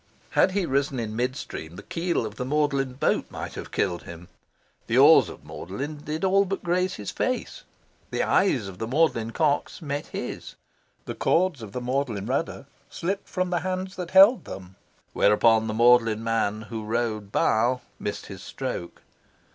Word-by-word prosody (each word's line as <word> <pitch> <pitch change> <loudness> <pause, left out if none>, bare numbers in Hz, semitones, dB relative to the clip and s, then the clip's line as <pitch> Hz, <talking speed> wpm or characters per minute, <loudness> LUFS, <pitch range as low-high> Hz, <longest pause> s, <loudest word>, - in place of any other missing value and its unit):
Had 185 - +3
he 200 -2 +1
risen 140 -2 0
in 110 -2 -4
mid 125 +2 -1
stream, 80 - -7
the 100 - -9
keel 170 -7 -1
of 105 - -6
the 125 - -3
Magdalen 140 -1 0
boat 130 - 0
might - - -6
have - - -7
killed 90 -3 -1
him. 85 +1 -11 0.6
The - - +1
oars - - +7
of - - -12
Magdalen 135 - -6
did 150 +3 -5
all 195 +1 +4
but 195 0 -4
graze 180 +2 0
his 105 - -5
face. 255 -1 -3 0.4
The - - -1
eyes 130 - +2
of 95 -1 -10
the 110 - -3
Magdalen 130 -5 +1
cox 145 +3 0
met 145 -3 -4
his. - - -6 0.5
The - - -4
cords 170 -6 +1
of 110 -3 -8
the 125 - -4
Magdalen 125 -5 -2
rudder 140 +5 -2 0.2
slipped 195 +4 -3
from 185 -1 -1
the 175 - +1
hands 185 +1 -3
that 180 -2 -5
held 195 +7 +7
them; 95 0 -9 0.4
whereupon 110 +2 +4
the 110 - -3
Magdalen 115 -2 +4
man 110 -2 0
who 110 0 -6
rowed 110 -2 -2
"bow" 120 +4 +2 0.2
missed - - -4
his - - -9
stroke. 85 - -6
125 Hz, 175 wpm, -25 LUFS, 110-170 Hz, 0.6 s, oars